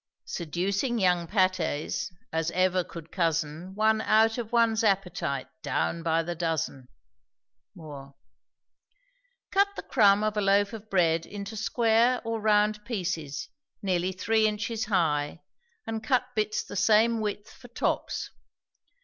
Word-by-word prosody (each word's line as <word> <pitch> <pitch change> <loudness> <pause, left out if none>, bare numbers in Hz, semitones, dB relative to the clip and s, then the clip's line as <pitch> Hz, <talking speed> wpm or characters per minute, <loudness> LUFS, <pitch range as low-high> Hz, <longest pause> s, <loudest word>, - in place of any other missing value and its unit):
Seducing 195 - -2
young 180 -4 +2
pâtés, 185 -7 0 0.2
as 160 0 0
ever 185 0 +2
could 165 -1 -11
cozen 165 +1 -1
One 220 +1 +3
out 220 +2 +3
of 230 -1 -5
one's 230 -1 +3
appetite, 180 -9 0
down 80 - -1
by 165 0 +1
the 175 +1 -3
dozen. 160 -6 -2 0.9
MOORE. 140 -4 -10 1.4
Cut 400 +1 +4
the - - -6
crumb 205 -4 +4
of 215 0 0
a 210 - +1
loaf 200 +2 +3
of 215 -1 -9
bread 165 -3 +2
into 205 +1 -7
square 230 +3 +2
or 225 -1 -2
round 210 0 +2
pieces, 175 - -4 0.3
nearly 185 -1 0
three 220 +4 +2
inches 215 +1 -2
high, 160 -6 0 0.4
and 225 0 -4
cut 250 +2 0
bits 215 -1 -1
the - - -9
same 220 +3 +3
width 210 -1 -4
for 245 - -14
tops. 240 - -2
200 Hz, 130 wpm, -27 LUFS, 170-220 Hz, 1.4 s, Cut